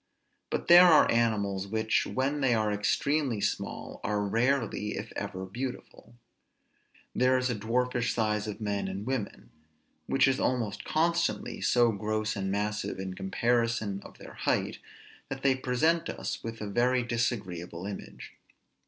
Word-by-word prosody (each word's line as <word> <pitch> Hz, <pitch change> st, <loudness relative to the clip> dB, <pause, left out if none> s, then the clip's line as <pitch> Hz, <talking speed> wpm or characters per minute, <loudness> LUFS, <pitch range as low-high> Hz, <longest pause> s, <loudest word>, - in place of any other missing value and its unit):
But -, -, -3 dB
there 175 Hz, +1 st, +9 dB
are 160 Hz, -3 st, +6 dB
animals, 100 Hz, -4 st, +1 dB
which, 110 Hz, +1 st, +1 dB
when 140 Hz, +3 st, -1 dB
they 125 Hz, -3 st, +3 dB
are 110 Hz, -1 st, +1 dB
extremely 125 Hz, +4 st, 0 dB
small, -, -, -3 dB
are 105 Hz, 0 st, 0 dB
rarely 115 Hz, -1 st, 0 dB
(if -, -, -6 dB
ever) 95 Hz, 0 st, -4 dB
beautiful. 120 Hz, +2 st, -7 dB, 1.0 s
There 130 Hz, +1 st, +3 dB
is 125 Hz, 0 st, 0 dB
a -, -, -1 dB
dwarfish 120 Hz, +3 st, 0 dB
size 105 Hz, -2 st, 0 dB
of 105 Hz, -, -5 dB
men 100 Hz, -3 st, -2 dB
and 95 Hz, +2 st, -5 dB
women, 130 Hz, -5 st, -4 dB, 0.6 s
which 135 Hz, -, +4 dB
is 135 Hz, 0 st, +1 dB
almost 120 Hz, -5 st, -1 dB
constantly 170 Hz, +2 st, 0 dB
so 120 Hz, -1 st, +4 dB
gross 110 Hz, +1 st, -2 dB
and 95 Hz, -1 st, -2 dB
massive 105 Hz, +2 st, -2 dB
in 95 Hz, -1 st, -5 dB
comparison 115 Hz, 0 st, 0 dB
of -, -, -13 dB
their -, -, -11 dB
height, -, -, -1 dB, 0.5 s
that 135 Hz, 0 st, -6 dB
they 135 Hz, -1 st, +5 dB
present 130 Hz, +6 st, +1 dB
us -, -, -4 dB
with 115 Hz, -1 st, -6 dB
a 105 Hz, -, -3 dB
very 125 Hz, +4 st, +2 dB
disagreeable 95 Hz, -8 st, -3 dB
image. 100 Hz, -1 st, -8 dB
115 Hz, 145 wpm, -29 LUFS, 105-125 Hz, 1.0 s, there